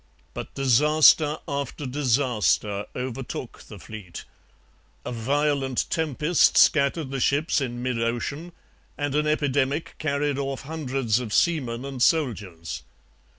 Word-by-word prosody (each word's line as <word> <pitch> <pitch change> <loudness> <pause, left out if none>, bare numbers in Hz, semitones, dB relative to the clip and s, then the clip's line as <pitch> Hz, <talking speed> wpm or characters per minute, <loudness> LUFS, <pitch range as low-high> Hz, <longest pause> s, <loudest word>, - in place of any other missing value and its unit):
But - - -7
disaster 150 +3 +4
after 140 0 -4
disaster 125 -6 0
overtook 125 -1 -5
the 105 - -10
fleet. 95 -3 -9 0.8
A - - -4
violent 135 +2 0
tempest 160 +1 +2
scattered 140 -1 +3
the 135 - -2
ships 145 +4 +1
in 120 -2 -4
mid 125 -2 -1
ocean 130 +9 -3 0.5
and 145 -2 -2
an 150 +1 +1
epidemic 145 0 0
carried 145 -2 -1
off 135 -1 -3
hundreds 135 -6 -1
of 120 -4 -6
seamen 130 -5 +1
and 135 -2 -6
soldiers. 105 - 0
135 Hz, 115 wpm, -25 LUFS, 120-150 Hz, 0.8 s, disaster